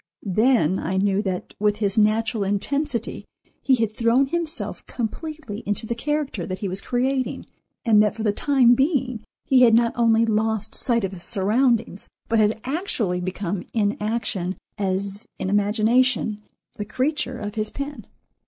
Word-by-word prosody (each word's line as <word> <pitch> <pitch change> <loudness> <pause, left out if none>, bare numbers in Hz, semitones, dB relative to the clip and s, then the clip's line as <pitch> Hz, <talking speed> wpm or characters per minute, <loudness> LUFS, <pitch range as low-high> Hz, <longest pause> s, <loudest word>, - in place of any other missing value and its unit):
Then 215 - +3
I 190 +3 -2
knew 195 +1 +2
that 190 -3 -4
with 210 0 +2
his 205 -2 0
natural 215 0 +2
intensity 235 +5 -1 0.4
he 265 - +4
had 225 -3 0
thrown 235 +4 +3
himself 335 +2 -4
completely 245 -1 -5
into 205 +2 -1
the 235 - -2
character 280 - -2
that 185 - -4
he 200 - -3
was 190 +1 -2
creating, 255 +1 -1 0.4
and 215 -3 +6
that 210 -1 +1
for 225 - -5
the 210 - +2
time 260 -1 +4
being 265 -4 0 0.2
he 260 -2 +4
had 230 -3 +7
not 230 0 +3
only 230 -1 +3
lost 220 -1 +1
sight 235 -3 +2
of 190 - -1
his 185 -3 -9
surroundings, 220 +2 0 0.2
but 225 0 +3
had 215 +1 +2
actually 250 - -2
become 185 0 -3
in 205 -2 +1
action, 200 -4 -2 0.2
as 195 +1 -3
in 190 - -3
imagination, 215 +2 +2 0.4
the - - -1
creature 255 +2 -1
of 205 -3 -5
his 215 -1 -2
pen. 280 -6 -6
220 Hz, 160 wpm, -23 LUFS, 205-255 Hz, 0.4 s, had